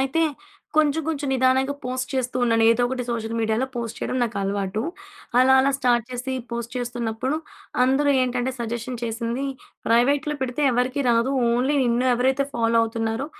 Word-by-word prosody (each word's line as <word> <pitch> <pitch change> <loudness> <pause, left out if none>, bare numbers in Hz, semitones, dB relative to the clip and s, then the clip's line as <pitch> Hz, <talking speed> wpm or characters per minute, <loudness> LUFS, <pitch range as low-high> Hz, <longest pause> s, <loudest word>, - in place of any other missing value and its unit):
అయితే 270 +5 +1 0.5
కొంచెం, 310 +1 +3
కొంచెం 290 -3 -2
నిదానంగా 260 +1 +2
పోస్ట్ 255 +1 -3
చేస్తూ 255 -1 -1
ఉన్నాను. 225 -1 +3
ఏదో 245 - 0
ఒకటి 250 0 -3
సోషల్ 225 -1 -3
మీడియాలో 225 +3 0
పోస్ట్ 235 -1 -4
చేయడం - - -2
నాకలవాటు. 200 -2 -1 0.6
అలా, 260 +1 +6
అలా 275 +1 +3
స్టార్ట్ 240 -3 +2
చేసి 255 +1 -4 0.2
పోస్ట్ 235 0 -4
చేస్తున్నప్పుడు 245 +2 -2 0.5
అందరూ 270 +3 +3
ఏంటంటే 250 0 -1
సజెషన్ 235 +1 -4
చేసింది 235 +3 -2 0.4
ప్రైవేట్‍లో 275 +6 +2
పెడితే 255 +3 -2
ఎవరికీ 250 +3 0
రాదు, 235 +2 +2 0.2
ఓన్లీ 260 +5 +1
నిన్ను 240 +1 +1
ఎవరైతే 265 +3 +1
ఫాలో 230 0 +1
అవుతున్నారో, 225 +2 -2
245 Hz, 150 wpm, -23 LUFS, 230-265 Hz, 0.6 s, అలా